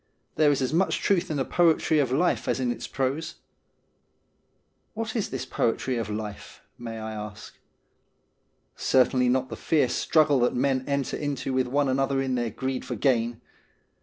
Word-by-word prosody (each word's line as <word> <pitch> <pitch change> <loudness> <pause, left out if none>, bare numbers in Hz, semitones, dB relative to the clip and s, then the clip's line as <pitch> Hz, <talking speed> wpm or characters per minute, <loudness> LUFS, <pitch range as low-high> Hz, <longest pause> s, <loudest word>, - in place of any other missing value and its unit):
There 155 -1 +4
is 140 -2 0
as 130 - -1
much 185 +4 +2
truth 195 -4 +1
in 155 - -2
the 135 - 0
poetry 160 -2 +3
of 135 -4 +1
life 170 +7 +1
as - - 0
in 125 -2 0
its - - -5
prose 135 +4 -2 0.8
'? - - -45
What 225 +1 -4
is 220 - -1
this 130 -1 -4
poetry 130 +1 -1
of 115 -3 -3
life? 105 -1 -7
may 115 -1 -7
I 110 0 -5
ask. 105 -1 -8 1.2
Certainly 125 -1 +3
not 130 +1 +1
the - - -5
fierce 140 -6 +1
struggle 150 0 +3
that 120 - +2
men 130 +1 +1
enter 140 -2 -1
into 140 -2 -3
with 130 -1 +1
one 140 +2 +1
another 135 +1 +1
in 135 -1 -1
their 120 -2 0
greed 130 +4 -3
for - - -4
gain. 120 -3 +1
130 Hz, 175 wpm, -26 LUFS, 120-145 Hz, 1.2 s, There